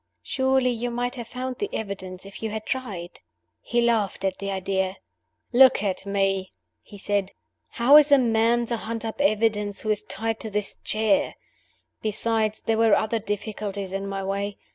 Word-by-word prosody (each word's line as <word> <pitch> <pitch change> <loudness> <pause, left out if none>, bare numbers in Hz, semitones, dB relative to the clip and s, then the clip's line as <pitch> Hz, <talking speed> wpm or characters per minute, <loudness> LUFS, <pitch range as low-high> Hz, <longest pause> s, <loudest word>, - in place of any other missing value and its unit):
"Surely 265 -1 +2
you 240 +1 -2
might 245 +1 -2
have 240 -3 -7
found 255 +1 -5
the 410 - -2
evidence 190 -3 -5
if 195 - -11
you 220 - -2
had 215 0 -5
tried?" 200 -10 -4 0.4
He 240 0 0
laughed 225 -5 +1
at 190 -1 -1
the 200 - -4
idea. 190 0 -1 0.6
"Look 260 -4 +6
at 195 0 0
me!" 195 -1 0 0.3
he 205 - -13
said. 200 -1 -1 0.4
"How 260 +5 +6
is 300 -1 +6
a 280 - +8
man 235 -1 +2
to 235 0 0
hunt 225 +1 -5
up 225 +5 -4
evidence 215 -5 +1
who 215 - +1
is 210 -1 +1
tied 215 +3 -3
to 220 - -2
this 210 -1 -2
chair? 220 +7 +1 0.7
Besides, 215 0 0
there 225 -1 0
were 225 -2 +5
other 225 +1 0
difficulties 205 -2 -4
in 195 0 -3
my 195 0 -3
way. 200 +1 -3
215 Hz, 175 wpm, -25 LUFS, 200-235 Hz, 0.7 s, a